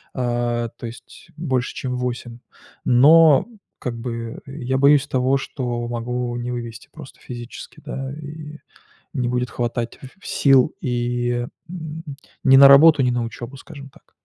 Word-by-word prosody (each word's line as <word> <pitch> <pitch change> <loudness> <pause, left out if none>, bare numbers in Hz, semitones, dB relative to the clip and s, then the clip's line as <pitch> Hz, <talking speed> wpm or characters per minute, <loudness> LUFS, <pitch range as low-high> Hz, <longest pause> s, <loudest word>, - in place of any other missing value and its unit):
А, 120 -2 -1
то - - -8
есть 115 - -13
больше 130 -6 -1
чем 125 -1 -3
8. 120 -1 -4 0.5
Но, 145 +3 +6 0.3
как 120 -2 -4
бы, 115 -1 -5
я 130 -1 -3
боюсь 140 +1 +4
того, 130 +1 +1
что 120 -3 -4
могу 120 +1 -3
не 120 +1 -4
вывезти 120 -1 -7
просто 150 -4 -13
физически. 120 -1 -9
Да, 135 0 -5
и 150 0 -9 0.6
не 125 -4 -1
будет 125 0 -1
хватать 120 -1 -3 0.2
сил 135 +1 +3
и 120 -2 -1 0.2
н 160 -2 -7 0.4
ни 135 0 +7
на 140 0 +10
работу, 145 +1 +7
ни 125 - +2
на 120 -1 -1
учебу, 120 +3 -7
скажем 140 -1 -11
так. - - -24
125 Hz, 145 wpm, -21 LUFS, 120-140 Hz, 0.6 s, на